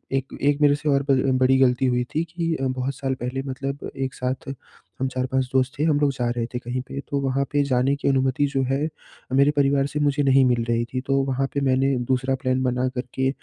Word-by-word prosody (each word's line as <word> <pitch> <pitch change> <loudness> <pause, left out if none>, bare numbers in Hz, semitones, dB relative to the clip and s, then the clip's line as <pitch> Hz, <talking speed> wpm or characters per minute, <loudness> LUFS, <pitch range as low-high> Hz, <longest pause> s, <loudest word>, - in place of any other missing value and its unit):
एक 135 0 -3
एक 145 +1 +2
मेरे 145 -1 +5
से 150 +1 -3
और 140 0 +2
ब 140 - 0
अ, 130 0 +2
बड़ी 130 +1 +4
गलती 130 0 +3
हुई 125 -1 +1
थी 160 - +2
कि 165 0 -2
अ, 135 -2 -1
बहुत 130 +1 -2
साल 135 -1 -2
पहले 130 +2 -2
मतलब 135 +1 -4
एक 135 -1 -2
साथ 130 +2 -4 0.5
हम 130 - 0
4-5 130 +1 -1
दोस्त 130 0 +2
थे, - - +2
हम 150 -3 +2
लोग 145 -1 +2
जा 125 -2 -1
रहे 115 - 0
थे 125 - -2
कहीं 125 +1 -4
पे। 140 - -6
तो 140 - 0
वहाँ 135 +1 0
पे 145 0 +2
जाने 135 0 +1
की - - -3
अनुमति 135 +1 +2
जो 135 - +1
है, 145 +3 0 0.5
मेरे 140 +2 +5
परिवार 140 -1 +3
से 150 +1 -4
मुझे 145 0 +2
नहीं 135 0 +5
मिल 120 -2 +2
रही 120 0 +1
थी, 130 +2 -4
तो 135 +1 -1
वहाँ 135 0 0
पे 140 - -1
मैंने 135 +1 +2
दूसरा 130 +1 0
प्लान 130 -1 0
बना 125 0 0
करके 130 +1 -1
135 Hz, 240 wpm, -23 LUFS, 130-140 Hz, 0.5 s, मेरे